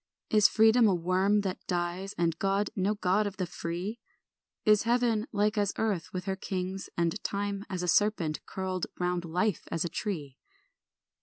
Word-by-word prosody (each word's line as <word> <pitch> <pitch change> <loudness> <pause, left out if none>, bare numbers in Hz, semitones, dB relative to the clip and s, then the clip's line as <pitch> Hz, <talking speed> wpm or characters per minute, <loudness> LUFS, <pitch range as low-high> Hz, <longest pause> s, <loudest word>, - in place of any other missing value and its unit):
Is 215 -2 +7
Freedom 225 +1 +5
a 195 - +3
worm 185 +4 +2
that 190 -2 -4
dies, 180 +2 -2
And 165 -1 0
God 195 +1 +1
no 200 +2 +1
God 200 +1 +1
of 200 - -7
the 185 - -1
free? 175 +6 -4 0.7
Is 210 -1 +6
heaven 235 -1 +1
like 210 0 +1
as 200 -1 +1
earth 205 -7 -1
with 180 -1 -4
her 195 -1 -1
kings 190 0 -4
And 170 +4 0
time 200 0 -2
as 185 -2 -3
a - - -2
serpent 175 -6 +2
curled 185 -1 -3
Round 180 -1 -1
life 180 +3 0
as 165 +1 0
a - - -2
tree? 160 -8 -4
190 Hz, 170 wpm, -29 LUFS, 180-210 Hz, 0.7 s, Is